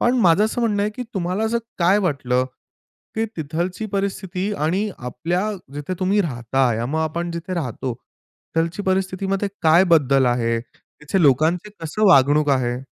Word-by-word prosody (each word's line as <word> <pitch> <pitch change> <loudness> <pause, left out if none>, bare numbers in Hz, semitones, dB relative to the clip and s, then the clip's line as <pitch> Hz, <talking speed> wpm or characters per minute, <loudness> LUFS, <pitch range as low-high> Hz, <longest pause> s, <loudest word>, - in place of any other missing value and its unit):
पण 240 - +3
माझं 180 +1 +5
असं 220 +3 -2
म्हणणं 210 -4 +1
आहे 210 - 0
की 250 - -3
तुम्हाला 185 +3 -1
असं 230 +1 +1 0.2
काय 185 +3 +4
वाटलं, 135 -9 0 0.7
की 225 - 0
तिथलची 170 +7 -3
परिस्थिती 195 0 -2
आणि 185 +6 0
आपल्या 165 - -2 0.2
जिथे 145 +5 -4
तुम्ही 195 +3 +2
राहताय, 120 - 0
मग 145 +6 -2
आपण 170 +2 -2
जिथे 170 +2 -5
राहतो 130 -5 -3 0.6
तिथलची 165 +4 0
परिस्थितीमध्ये 190 +1 -1
काय 165 +3 +6
बदल 140 -5 +4
आहे? 115 -1 +1
तिथे 150 +8 -5
लोकांचे 160 +8 +3
कसं 165 +7 -1
वागणूक 145 -2 +5
आहे? 125 -2 0
170 Hz, 150 wpm, -21 LUFS, 140-195 Hz, 0.7 s, काय